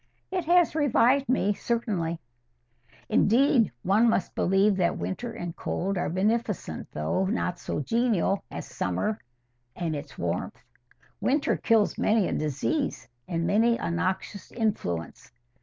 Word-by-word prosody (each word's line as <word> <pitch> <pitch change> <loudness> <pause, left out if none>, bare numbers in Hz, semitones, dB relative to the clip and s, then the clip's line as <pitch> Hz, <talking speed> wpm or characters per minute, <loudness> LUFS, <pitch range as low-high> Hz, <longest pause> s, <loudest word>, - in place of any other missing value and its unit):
"It 365 -3 -1
has 350 0 +4
revived 275 -3 +3
me, 205 -5 +2
certainly." 195 -8 -2 0.9
"Indeed, 235 - +4
one 215 +6 +4
must 195 -5 0
believe 195 +2 +3
that 175 -2 +1
winter 240 +5 -4
and 175 -5 -6
cold 195 +2 -2
are 175 - -1
as 160 - -4
beneficent, 210 - -1
though 80 - -1
not 185 -4 -1
so - - -3
genial, 220 - +1
as - - -6
summer 90 - -2 0.6
and 165 -3 -2
its 145 - -8
warmth. - - -3 0.6
Winter 280 +2 +1
kills 225 -3 +2
many 215 -3 +3
a - - -2
disease 155 - -1 0.2
and 170 -1 -1
many 230 +5 +3
a - - -3
noxious 185 +2 -3
influence. 90 - -3
205 Hz, 135 wpm, -27 LUFS, 170-235 Hz, 0.9 s, has